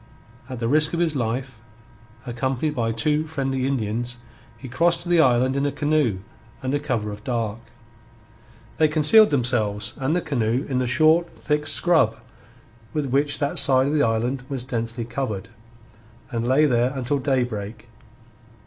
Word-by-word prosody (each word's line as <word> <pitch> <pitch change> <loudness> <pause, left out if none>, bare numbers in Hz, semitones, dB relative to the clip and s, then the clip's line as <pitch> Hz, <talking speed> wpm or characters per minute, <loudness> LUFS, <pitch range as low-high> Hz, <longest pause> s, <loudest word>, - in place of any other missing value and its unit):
At 130 - -6
the 115 0 -2
risk 155 +5 +3
of - - -2
his 165 -3 0
life, 125 -1 -3 0.7
accompanied 130 +5 -2
by 115 -4 -1
two 150 +5 0
friendly 135 -4 -2
Indians, 120 -1 -3 0.4
he 135 - -10
crossed 170 +7 +1
to 175 - -8
the 175 -2 +4
island 130 -1 +2
in 140 - 0
a 145 - 0
canoe 145 -8 0 0.4
under 135 +3 -1
cover 120 -8 -3
of 105 +1 -10
dark. 115 -3 -3 1.2
They 155 - +4
concealed 155 +8 +5
themselves 110 -5 0
and 135 +5 0
the 180 - 0
canoe 125 -3 -1
in 130 -2 -1
the 130 - -1
short 155 +7 +2
thick 150 0 -1
scrub 145 -7 +3 0.8
with 145 -4 -2
which 145 +2 +2
that 145 +3 +2
side 135 -2 +5
of 145 - -1
the 150 - +2
island 120 +2 0
was 135 -3 -3
densely 115 -2 -4
covered, 110 -6 -4 0.8
and 115 -1 -2
lay 135 +4 +4
there 125 -2 +1
until 135 +2 -1
daybreak. 120 -5 -3
130 Hz, 160 wpm, -23 LUFS, 120-150 Hz, 1.2 s, concealed